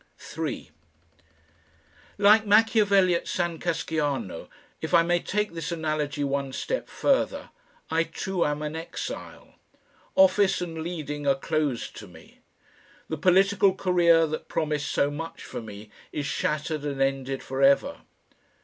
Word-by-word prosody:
3 -, -, -5 dB, 1.5 s
Like 210 Hz, +2 st, +6 dB
Machiavelli 205 Hz, -3 st, +4 dB
at 170 Hz, -, -2 dB
San 175 Hz, -2 st, -2 dB
Casciano, 145 Hz, -, -2 dB, 0.3 s
if 160 Hz, +2 st, 0 dB
I 165 Hz, -, +6 dB
may 175 Hz, +1 st, +2 dB
take 210 Hz, +2 st, -2 dB
this 165 Hz, +1 st, -4 dB
analogy 155 Hz, -3 st, -2 dB
one 140 Hz, -1 st, -2 dB
step -, -, -3 dB
further, -, -, 0 dB, 0.4 s
I 165 Hz, +1 st, +2 dB
too 180 Hz, +2 st, -2 dB
am 150 Hz, 0 st, -1 dB
an 150 Hz, +1 st, -4 dB
exile. 165 Hz, +1 st, -7 dB, 0.6 s
Office 210 Hz, -9 st, +4 dB
and 165 Hz, -2 st, -5 dB
leading 150 Hz, -4 st, -4 dB
are 135 Hz, -, +4 dB
closed 145 Hz, -3 st, -2 dB
to -, -, -9 dB
me. -, -, -17 dB, 0.7 s
The 160 Hz, -, -2 dB
political 190 Hz, +3 st, +4 dB
career 170 Hz, -3 st, +4 dB
that 155 Hz, 0 st, -5 dB
promised 150 Hz, -2 st, -2 dB
so 145 Hz, -, +1 dB
much 165 Hz, +3 st, -7 dB
for -, -, -6 dB
me 105 Hz, -1 st, -10 dB, 0.2 s
is 145 Hz, -, -3 dB
shattered 150 Hz, +1 st, -2 dB
and 140 Hz, -2 st, -3 dB
ended 135 Hz, 0 st, -1 dB
for 135 Hz, +1 st, -4 dB
ever. 140 Hz, -, +4 dB
160 Hz, 135 wpm, -26 LUFS, 145-180 Hz, 1.5 s, Like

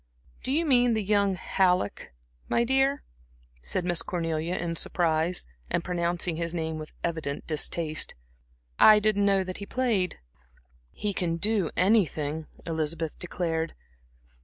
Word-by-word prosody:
"Do -, -, -3 dB
you 320 Hz, +4 st, +2 dB
mean 245 Hz, -5 st, +4 dB
that 220 Hz, -, 0 dB
young 200 Hz, -1 st, +2 dB
Halleck, 180 Hz, -, 0 dB, 0.4 s
my 235 Hz, -, +3 dB
dear?" 270 Hz, +3 st, +2 dB, 0.6 s
said 65 Hz, -, -2 dB
Miss 175 Hz, -2 st, +2 dB
Cornelia 165 Hz, 0 st, -2 dB
in 170 Hz, -1 st, -2 dB
surprise, 165 Hz, 0 st, 0 dB, 0.2 s
and 170 Hz, -, 0 dB
pronouncing 175 Hz, -1 st, -1 dB
his 170 Hz, 0 st, -2 dB
name 160 Hz, -1 st, -2 dB
with 155 Hz, -, -8 dB
evident 160 Hz, -4 st, -3 dB
distaste. 155 Hz, 0 st, -1 dB, 0.6 s
"I 215 Hz, -1 st, +9 dB
didn't 210 Hz, -1 st, +2 dB
know 195 Hz, -1 st, +3 dB
that 185 Hz, 0 st, -6 dB
he 200 Hz, -, -7 dB
played." 225 Hz, -9 st, 0 dB, 0.7 s
"He 205 Hz, -, -3 dB
can 170 Hz, -2 st, -1 dB
do 205 Hz, -2 st, +2 dB
anything," 160 Hz, -6 st, +2 dB, 0.2 s
Elizabeth 160 Hz, -1 st, -2 dB
declared. 165 Hz, -2 st, -2 dB
175 Hz, 135 wpm, -27 LUFS, 160-205 Hz, 0.7 s, I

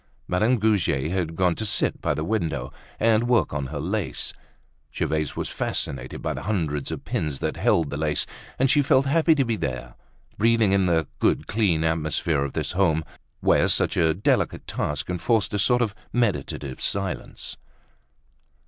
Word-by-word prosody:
Madame 110 Hz, +8 st, +2 dB
Goujet 90 Hz, -, +1 dB
had 85 Hz, -3 st, -1 dB
gone 90 Hz, 0 st, +2 dB
to 110 Hz, -, -5 dB
sit 105 Hz, -, 0 dB
by -, -, 0 dB
the 75 Hz, -, -2 dB
window 80 Hz, -, -2 dB, 0.3 s
and 115 Hz, +1 st, +3 dB
work 115 Hz, -13 st, +3 dB
on 70 Hz, -2 st, -2 dB
her 75 Hz, +2 st, -5 dB
lace. 95 Hz, +4 st, -2 dB, 0.6 s
Gervaise 75 Hz, -2 st, -1 dB
was -, -, -3 dB
fascinated 65 Hz, -2 st, -3 dB
by -, -, -1 dB
the -, -, -6 dB
hundreds 80 Hz, -9 st, -1 dB
of -, -, -6 dB
pins 75 Hz, -3 st, -2 dB
that -, -, -2 dB
held 80 Hz, -4 st, +2 dB
the 70 Hz, -, -3 dB
lace, 75 Hz, -1 st, 0 dB, 0.3 s
and 135 Hz, -, +3 dB
she 145 Hz, -, +5 dB
felt 135 Hz, 0 st, +3 dB
happy 160 Hz, +3 st, +4 dB
to 135 Hz, -3 st, +2 dB
be 115 Hz, -1 st, 0 dB
there, 65 Hz, -5 st, -4 dB, 0.5 s
breathing 115 Hz, -2 st, +4 dB
in 95 Hz, -1 st, +3 dB
the 80 Hz, -2 st, +2 dB
good -, -, +2 dB
clean 95 Hz, -8 st, +1 dB
atmosphere 80 Hz, -2 st, 0 dB
of 70 Hz, -, -4 dB
this -, -, -2 dB
home 85 Hz, -4 st, +2 dB, 0.4 s
where -, -, +4 dB
such -, -, +2 dB
a 80 Hz, -2 st, +3 dB
delicate 100 Hz, -, 0 dB
task 75 Hz, -, -2 dB
enforced 95 Hz, +4 st, 0 dB
a 105 Hz, -, 0 dB
sort 125 Hz, +5 st, +3 dB
of 105 Hz, -4 st, -2 dB, 0.2 s
meditative 100 Hz, -, -1 dB
silence. 95 Hz, -3 st, -3 dB
90 Hz, 170 wpm, -24 LUFS, 75-110 Hz, 0.6 s, she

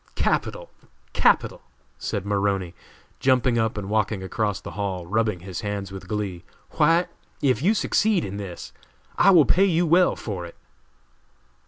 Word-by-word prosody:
"Capital! -, -, -1 dB, 0.4 s
capital!!" -, -, +2 dB, 0.4 s
said 100 Hz, -, -3 dB
Maroney, 100 Hz, -3 st, -1 dB, 0.5 s
jumping 125 Hz, -2 st, +2 dB
up 110 Hz, -1 st, 0 dB
and 100 Hz, -2 st, -4 dB
walking 105 Hz, -2 st, 0 dB
across 105 Hz, +1 st, -2 dB
the -, -, -9 dB
hall, 95 Hz, -4 st, -4 dB
rubbing 110 Hz, -1 st, 0 dB
his 95 Hz, +2 st, -6 dB
hands 100 Hz, -2 st, -4 dB
with 95 Hz, -1 st, -9 dB
glee. 100 Hz, -4 st, -4 dB, 0.3 s
"White, 165 Hz, +3 st, +3 dB, 0.3 s
if 130 Hz, -4 st, +1 dB
you 200 Hz, +8 st, +3 dB
succeed 210 Hz, -4 st, +1 dB
in 100 Hz, +1 st, -6 dB
this 95 Hz, -4 st, -8 dB, 0.5 s
I 195 Hz, -, +6 dB
will 170 Hz, -6 st, +7 dB
pay 195 Hz, +3 st, +4 dB
you 175 Hz, -2 st, +2 dB
well 175 Hz, +3 st, +4 dB
for 95 Hz, -5 st, -5 dB
it." 85 Hz, -, -10 dB
105 Hz, 150 wpm, -24 LUFS, 95-140 Hz, 0.5 s, will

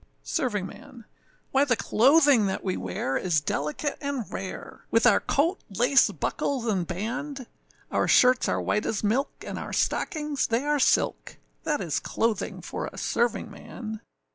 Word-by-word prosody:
SERVINGMAN. 235 Hz, -, -4 dB, 0.5 s
Why 270 Hz, +1 st, +4 dB
the 260 Hz, -4 st, +2 dB
clothing 265 Hz, 0 st, +4 dB
that 190 Hz, -, -3 dB
we 185 Hz, -2 st, -1 dB
wear 95 Hz, +8 st, -2 dB
is 175 Hz, -4 st, +1 dB
delicate 150 Hz, -, -3 dB
and 280 Hz, -5 st, -2 dB
rare, 190 Hz, -1 st, -7 dB
With 230 Hz, -, +3 dB
our 235 Hz, -4 st, +6 dB
coat, 330 Hz, +7 st, +1 dB
lace, 245 Hz, +7 st, +4 dB
buckles, 265 Hz, -4 st, -2 dB
and 190 Hz, -7 st, 0 dB
band; 250 Hz, +9 st, -4 dB, 0.5 s
Our -, -, +1 dB
shirts 255 Hz, 0 st, +5 dB
are -, -, 0 dB
white 210 Hz, -, 0 dB
as 220 Hz, -, -2 dB
milk, 235 Hz, +7 st, +1 dB, 0.2 s
and -, -, -5 dB
our -, -, -6 dB
stockings 300 Hz, -3 st, 0 dB
they 230 Hz, +3 st, 0 dB
are 295 Hz, 0 st, +1 dB
silk, -, -, +1 dB, 0.3 s
That 295 Hz, -2 st, 0 dB
is 155 Hz, -5 st, -1 dB
clothing 225 Hz, -3 st, -2 dB
for -, -, -5 dB
a -, -, -10 dB
servingman. 220 Hz, -1 st, -3 dB
235 Hz, 150 wpm, -26 LUFS, 205-280 Hz, 0.5 s, our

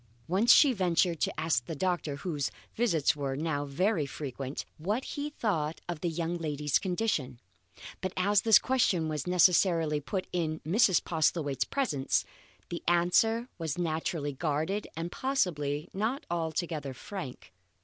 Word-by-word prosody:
Once 195 Hz, +7 st, +4 dB
she 280 Hz, -4 st, +7 dB
ventured 175 Hz, -4 st, +1 dB
to -, -, -1 dB
ask 155 Hz, -7 st, 0 dB
the 165 Hz, -, -4 dB
doctor, 175 Hz, -3 st, -1 dB
whose 145 Hz, -2 st, -2 dB, 0.2 s
visits 170 Hz, -, +2 dB
were 140 Hz, -2 st, -2 dB
now 145 Hz, -1 st, -1 dB
very 165 Hz, +2 st, 0 dB
frequent, 135 Hz, -1 st, -5 dB
what 210 Hz, +11 st, -1 dB
he 290 Hz, +1 st, -4 dB
thought 165 Hz, -, -1 dB
of 175 Hz, -3 st, -4 dB
the 175 Hz, -, 0 dB
young 170 Hz, +1 st, -2 dB
lady's 150 Hz, -3 st, 0 dB
condition. 175 Hz, -, -1 dB, 0.6 s
But 185 Hz, -, -2 dB
as 200 Hz, +2 st, +3 dB
this 225 Hz, -2 st, +7 dB
question 190 Hz, -11 st, +1 dB
was 150 Hz, 0 st, -3 dB
necessarily 170 Hz, -3 st, +4 dB
put 185 Hz, +6 st, -3 dB
in 160 Hz, -3 st, -1 dB
Mrs. 190 Hz, +3 st, +3 dB
Postlethwaite's 155 Hz, -4 st, 0 dB
presence, 155 Hz, -, 0 dB, 0.4 s
the 170 Hz, -, -4 dB
answer 180 Hz, +7 st, +3 dB
was 160 Hz, -2 st, -3 dB
naturally 160 Hz, -3 st, -2 dB
guarded, 160 Hz, +8 st, -1 dB
and 165 Hz, +1 st, -3 dB
possibly 155 Hz, -, -1 dB
not 220 Hz, +8 st, -2 dB
altogether 160 Hz, -4 st, -2 dB
frank. 135 Hz, -, -8 dB
165 Hz, 140 wpm, -30 LUFS, 150-190 Hz, 0.6 s, she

